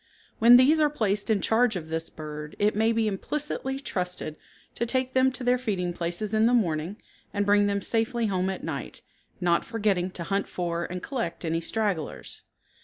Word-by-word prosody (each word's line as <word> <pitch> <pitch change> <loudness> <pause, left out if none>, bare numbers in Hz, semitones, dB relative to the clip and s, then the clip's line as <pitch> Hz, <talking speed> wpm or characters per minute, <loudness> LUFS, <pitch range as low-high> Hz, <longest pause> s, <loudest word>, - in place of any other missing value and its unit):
When 235 +2 +9
these 285 +5 +5
are 300 - +4
placed 210 -7 -1
in 210 -3 +2
charge 225 -1 +3
of 160 -3 -5
this 160 0 -2
bird 150 -1 -8
it 210 0 +2
may 220 +2 +3
be 225 -1 +1
implicitly 270 +5 -3
trusted 180 - -3 0.4
to 235 - -2
take 260 +1 0
them 260 0 +4
to 255 - -6
their 245 0 +3
feeding 185 -7 -2
places 175 +5 -2
in 220 +1 +4
the 245 - +4
morning 175 -2 0 0.4
and 205 0 +1
bring 205 0 +4
them 200 -1 -1
safely 230 +1 0
home 190 -2 0
at 190 - -5
night, - - -5 0.4
not 175 -2 +2
forgetting 205 -5 0
to 170 - -4
hunt 195 +3 -1
for 170 -1 -2
and 180 +1 -6
collect 230 -11 -3
any 165 +1 0
stragglers. 195 -4 -3
205 Hz, 185 wpm, -27 LUFS, 175-235 Hz, 0.4 s, When